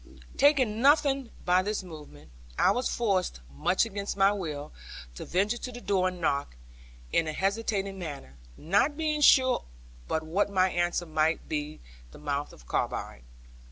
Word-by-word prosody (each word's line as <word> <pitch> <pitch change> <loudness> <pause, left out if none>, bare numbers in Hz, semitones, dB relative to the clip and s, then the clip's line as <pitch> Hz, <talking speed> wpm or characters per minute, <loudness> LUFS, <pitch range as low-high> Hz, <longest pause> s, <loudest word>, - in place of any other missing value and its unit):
Taking 260 -7 +3
nothing 275 -2 +3 0.2
by 180 +1 +4
this 205 +1 -2
movement, 150 - -12 0.3
I - - +4
was 250 +1 0
forced, 190 - 0
much 185 - +2
against 200 -2 -4
my 195 0 +5
will, 155 -7 -5 0.4
to - - -8
venture 205 +6 0
to 250 - -6
the 245 - -8
door 190 -4 +1
and 180 -1 -5
knock, 140 - -1 0.6
in 165 - +2
a 155 - -2
hesitating 195 0 -1
manner, 140 - -7 0.2
not 205 - +1
being 305 -2 -1
sure 260 -3 +5 0.4
but 160 - -1
what 180 +7 0
my 190 -2 +2
answer 175 0 0
might 160 0 0
be 150 0 -4 0.3
the - - -14
mouth 145 -1 -3
of - - -16
a - - -23
carbine. - - -3
190 Hz, 160 wpm, -28 LUFS, 155-225 Hz, 0.6 s, my